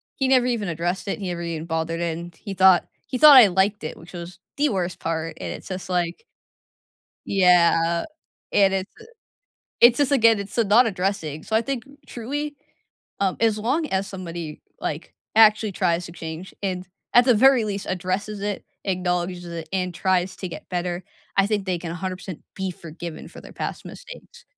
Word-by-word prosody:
he 270 - 0
never 255 -2 +4
even 230 -5 -1
addressed 175 +4 -2
it, 195 - -2
he 190 - -4
never 170 -1 -4
even 165 -1 -4
bothered, 165 +1 -2
and 170 0 -4
he 200 +2 -7
thought 190 -1 +5 0.2
he 255 - -3
thought 290 0 +10
I 230 -5 +10
liked 190 +1 +1
it, - - -5
which 165 +2 -14
was 175 +1 -8 0.2
the 295 +1 +3
worst 180 -4 -2
part, 165 0 -3
and - - -5
it's - - -10
just 185 0 -6
like 175 - -1 1.0
Yeah, 170 -3 +4 0.5
and 195 -1 +4
it's 190 +1 -2
uh - - -13 0.8
it's 240 +2 +7
just, 285 -1 +2
again, 225 -5 +5
it's, 200 +2 -7
eh, 230 - +4
not 225 +4 +5
addressing 185 -6 -2
so, 220 - -5
I - - +4
think 240 -1 -3 0.2
truly, 290 +5 -4 0.6
um, 190 -2 +1
as 220 -2 +2
long 275 +9 0
as 190 -1 -1
somebody, 170 -5 -7 0.2
like, - - -5 0.2
actually 215 -1 +6
tries 175 -1 0
to 170 - -10
change, 165 +2 -8
and 185 -1 -3 0.3
at 245 0 +8
the 250 - +6
very 260 0 +5
least 200 -2 -4
addresses 190 +3 -2
it, 205 -1 -3 0.2
acknowledges 180 -1 -1
it, 170 -1 -7
and 180 -2 -1
tries 185 0 0
to 185 - -5
get - - -9
better, 175 0 -2 0.3
I 195 0 +4
think 205 -2 -1
they 180 -2 0
can 165 -1 -6
100% 185 -1 -6
be 190 -1 -2
forgiven 170 -1 -8
for - - -12
their - - -13
past - - -5
mistakes. 475 -1 -12
185 Hz, 185 wpm, -23 LUFS, 175-215 Hz, 1.0 s, thought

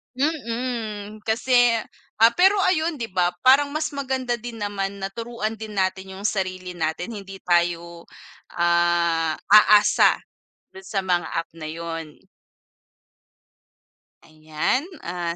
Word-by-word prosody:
Mm, 230 -7 -3
kasi 245 +1 +3 0.5
ah, 225 - +9
pero 380 +3 +6 0.2
ayun 320 -5 -1
'di 225 - -3
ba, 180 -1 +1
parang 285 +2 +5
mas 310 0 -1
maganda 265 -4 -2
din 230 -1 -8
naman 200 -1 -3
na 195 - -2
turuan 230 0 -5
din 215 0 -8
natin 190 0 -2
'yung 195 - -9
sarili 185 -3 -3
natin, 160 +5 -2
hindi 195 -1 -10
tayo, 170 -1 0 0.5
ah, 170 -2 +2 0.2
aasa 210 0 +6 0.5
dun 190 - -11
sa 195 0 -3
mga 175 -3 0
app 165 0 -3
na 155 -2 -7
'yun. 165 -1 -7 2.0
Ayan, 155 - -2 0.2
ah, 170 -1 -3
195 Hz, 120 wpm, -23 LUFS, 175-235 Hz, 2.0 s, ah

